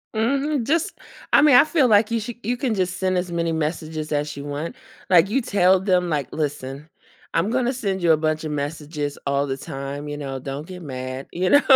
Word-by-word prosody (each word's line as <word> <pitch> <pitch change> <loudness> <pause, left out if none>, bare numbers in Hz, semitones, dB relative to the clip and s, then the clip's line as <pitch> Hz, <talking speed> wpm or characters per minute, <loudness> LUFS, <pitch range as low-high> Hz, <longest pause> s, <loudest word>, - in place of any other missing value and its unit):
Mhm. 275 +4 +1
Just, 330 +7 0 0.4
I - - +8
mean, 295 -3 +7
I 245 - +9
feel 305 -6 +3
like 215 0 +4
you 230 - +1
should 235 +2 -6
you 245 +4 -1
can 245 -2 0
just 185 -2 -1
send 185 -1 +1
as 180 -1 -2
many 170 -1 0
messages 155 0 -3
as 150 0 -1
you 140 - -6
want. 145 +3 -4 0.3
Like, 180 +1 +6
you 270 +5 +1
tell 190 -4 +4
them, 180 -2 +1
like, 145 -4 -1
"Listen, 145 -1 -4 0.4
I'm 165 +5 +1
gonna 255 0 +1
send 195 -6 -2
you 170 - +4
a 155 - +3
bunch 155 0 -1
of 155 - -3
messages 145 0 -3
all 140 0 +1
the 135 0 -2
time, 140 +2 -6
you 145 0 -4
know, 135 -2 -5
don't 135 +3 -5
get 180 -1 -9
mad, 130 -2 -6
you 180 +1 0
know. 285 - +7
170 Hz, 220 wpm, -23 LUFS, 145-215 Hz, 0.4 s, I